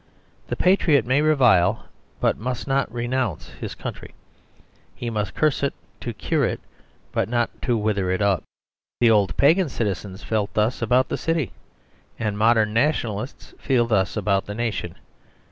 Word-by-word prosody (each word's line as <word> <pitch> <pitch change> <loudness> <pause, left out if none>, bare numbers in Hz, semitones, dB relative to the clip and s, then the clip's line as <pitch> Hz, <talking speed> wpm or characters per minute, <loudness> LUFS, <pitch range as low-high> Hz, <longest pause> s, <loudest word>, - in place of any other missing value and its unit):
The - - -2
patriot 175 - +3
may 130 +4 +2
revile 120 - +3 0.3
but - - +2
must 125 +3 -4
not 135 -3 0
renounce 120 - -2
his - - -7
country; - - -8 0.8
he 120 -1 -4
must 105 -3 -3
curse 155 -3 +1
it 140 - 0 0.2
to - - -4
cure - - -1
it, - - 0 0.5
but - - -1
not 120 -1 +1
to 120 -3 +1
wither 105 -3 0
it 95 - 0
up. 100 -3 +2 0.6
The 120 -2 +5
old 105 -3 +2
pagan 165 +4 +4
citizens 100 -4 -3
felt 105 -2 -2
thus 110 +4 +1
about 125 +3 +2
the - - -1
city; 165 -6 -1 0.7
and 105 -2 -2
modern 110 0 +3
nationalists 120 -3 -1
feel 125 -4 +2
thus 105 -3 +1
about 100 -2 +1
the 105 - -5
nation. 110 -7 -3
115 Hz, 155 wpm, -23 LUFS, 105-130 Hz, 0.8 s, The